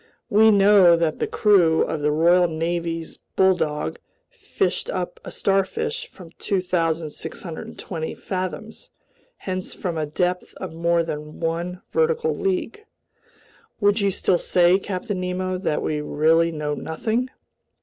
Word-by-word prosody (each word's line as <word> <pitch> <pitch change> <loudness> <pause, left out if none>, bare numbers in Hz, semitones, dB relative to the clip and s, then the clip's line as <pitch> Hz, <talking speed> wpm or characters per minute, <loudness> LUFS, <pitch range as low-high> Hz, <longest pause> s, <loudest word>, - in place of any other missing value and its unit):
We 220 +2 +6
know 200 -4 +6
that 165 -2 0
the - - 0
crew 180 -7 +4
of 155 - -3
the 150 0 +2
Royal 175 +3 +4
Navy's 165 0 -3 0.2
Bulldog 180 -6 +1 0.3
fished - - -2
up - - -4
a - - -7
starfish 195 -1 -1
from 170 -3 -14
2,620 165 -2 -3
fathoms, 185 - -5 0.5
hence 185 -1 -4
from 170 -3 -3
a 155 - -2
depth 180 +4 -2
of 185 -4 -7
more 170 +1 +1
than 150 -1 -6
one 170 +2 -3
vertical 470 0 +1
league. 390 +2 -2 1.0
Would 205 +1 +3
you 200 - +3
still 180 -1 +1
say, 180 +1 +3
Captain 195 +1 -4
Nemo, 185 0 -2
that 155 -5 -1
we 150 -1 -1
really 160 +3 +2
know 150 -2 -3
nothing?" 220 - -2
180 Hz, 130 wpm, -23 LUFS, 160-195 Hz, 1.0 s, We